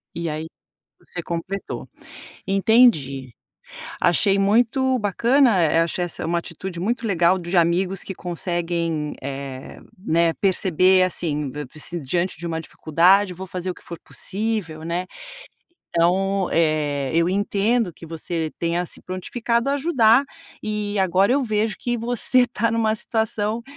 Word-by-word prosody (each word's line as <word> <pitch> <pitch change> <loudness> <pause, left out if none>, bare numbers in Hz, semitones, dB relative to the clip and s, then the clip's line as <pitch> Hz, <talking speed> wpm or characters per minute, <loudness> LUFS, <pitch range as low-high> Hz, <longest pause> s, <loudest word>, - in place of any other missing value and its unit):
E 170 0 -3
aí 155 +1 -4 0.6
você 175 - -6
completou. 175 +4 -5 0.6
Entendi, 190 - +3 0.7
achei 195 +3 +3
muito 245 +6 +2
bacana, 235 +1 +3
eh, 165 0 +3
achei 170 +2 -1
essa 170 - -4
uma 170 +1 0
atitude 170 +1 -7
muito 230 +5 -1
legal 180 -2 +3
de 175 +1 -4
amigos 180 +3 +2
que 190 - -7
conseguem, 170 -3 -2
eh, 135 -1 -7 0.2
né, 170 -3 +1
perceber 185 -1 +4
assim, 150 -6 -2
v 150 +2 -6 0.3
d 175 - -3
diante 170 +5 -1
de 170 - -4
uma 165 -1 -2
dificuldade 180 +5 +3
vou 190 +2 -7
fazer 185 0 -5
o 180 - -4
que - - -17
for 170 -2 -8
possível, 200 -6 -4
né. 170 +2 -2 0.9
Então, 190 +3 +1
eh, 150 -4 +1
eu 170 +1 +3
entendo 205 +2 +1
que 165 - -13
você 165 0 -4
tenha 170 +1 0
se - - -7
prontificado 235 +7 -2
a - - +2
ajudar, 270 -5 +4 0.4
e 210 -1 -3
agora 190 +3 +3
eu 275 0 +2
vejo 215 -1 0
que 240 -1 -2
você 245 +2 +2
está 230 -2 +1
numa 225 -1 +2
situação 220 0 -1
185 Hz, 140 wpm, -22 LUFS, 165-215 Hz, 0.9 s, perceber